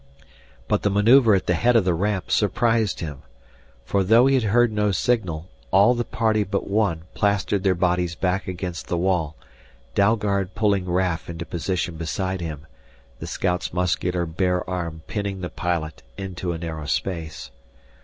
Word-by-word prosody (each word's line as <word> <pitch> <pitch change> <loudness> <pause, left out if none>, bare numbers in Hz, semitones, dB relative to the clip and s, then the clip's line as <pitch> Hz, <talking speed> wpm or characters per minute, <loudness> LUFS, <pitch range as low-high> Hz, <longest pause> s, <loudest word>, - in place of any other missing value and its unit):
But - - +1
the 105 - +1
maneuver 110 +3 +5
at 95 - -1
the 90 - +2
head 120 +8 +2
of 110 -5 +4
the 90 - +2
ramp 95 +2 -1
surprised 110 +1 +1
him. 75 -4 -6 0.6
For, 100 +9 +1
though 115 +6 +5
he 135 - +4
had 130 -4 +2
heard 120 +3 +3
no 105 -1 +1
signal, 95 -7 0 0.2
all 100 +6 +5
the 120 -1 -1
party 110 -2 +1
but 100 0 -3
one 100 -6 0
plastered 100 -1 +1
their 95 -1 +2
bodies 90 -1 0
back 95 +3 -1
against 90 -2 -5
the 85 - -1
wall, 85 -4 0 0.6
Dalgard 100 -2 +1
pulling 100 -4 +1
Raf 90 -2 0
into 85 0 -5
position 85 0 -2
beside 95 +3 -2
him, 80 -2 -6 0.5
the - - -6
scout's 90 -1 -1
muscular 90 0 0
bare 90 +2 -1
arm 85 -3 -4
pinning 100 -3 -4
the 90 - -5
pilot 85 -5 -3 0.2
into 95 -2 -4
a 85 - -3
narrow 80 -2 -5
space. 80 -8 -3
95 Hz, 165 wpm, -23 LUFS, 85-105 Hz, 0.6 s, maneuver